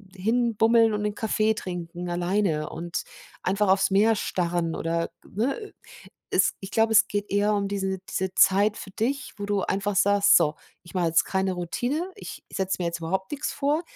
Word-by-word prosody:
hin 230 +4 0
bummeln 225 +1 +4
und 210 0 -2
'nen 210 - -1
Kaffee 220 0 +1
trinken 175 -3 -6
alleine 175 -3 0
und 170 +1 -4 0.4
einfach 200 +2 +1
aufs 195 +1 +3
Meer 215 +3 +4
starren 175 -4 -1
oder 165 0 -1
ne? 275 - -3 0.6
Es - - +3
ich 195 - -8
glaube, 225 +1 +2
es 220 - +6
geht 205 0 -3
eher 205 +1 +2
um 200 -1 -1
diese 195 -1 -2
diese 190 0 -2
Zeit 205 +3 +4
für 195 - -8
dich, 270 +9 -2
wo 205 - -4
du 205 -1 0
einfach 200 +2 -1
sagst: 200 +2 +5
„So, 155 -3 +2 0.3
ich 170 - -14
mache 180 -3 0
jetzt 165 0 +3
keine 190 -1 -1
Routine, 245 - -2
ich - - -9
setze 190 -1 -1
mir - - 0
jetzt 170 0 -3
überhaupt 190 - -3
nix 290 0 -3
vor. 295 +3 0
200 Hz, 185 wpm, -25 LUFS, 180-220 Hz, 0.6 s, es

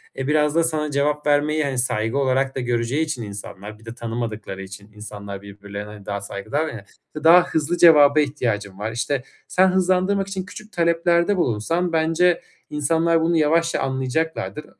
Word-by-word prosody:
eee, 135 0 -4
biraz 150 0 +2
da 165 - +4
sana 155 -2 -1
cevap 150 +1 0
vermeyi, 150 +1 +2
hani, 135 -2 -2
saygı 115 0 -1
olarak 135 0 +1
da - - -2
göreceği 120 +4 0
için 150 -7 -4
insanlar. 100 0 -9
Bir 110 - -19
de 115 +1 -8
tanımadıkları 115 -5 -5
için 100 +2 -11
insanlar 100 -2 -8
birbirlerine 100 +1 -9
daha 100 -1 -4
saygılılar 110 +10 -3
ya. 110 -9 -8 0.4
"Daha 175 +2 +8
hızlı 160 +2 -1
cevaba 150 -4 +7
ihtiyacım 115 -9 -2
var," 110 +2 -3
işte, 125 +3 -2 0.2
sen 185 +1 +4
hızlandırmak 185 +1 +1
için 190 -2 -4
küçük 215 +3 -11
taleplerde 170 +3 +2
bulunsan 165 +6 0
bence 165 +2 +2 0.3
insanlar 165 +3 +1
bunu 165 +1 +2
yavaşça 165 +2 +2
anlayacaklardır. 145 +4 -2
145 Hz, 160 wpm, -22 LUFS, 110-165 Hz, 0.4 s, Daha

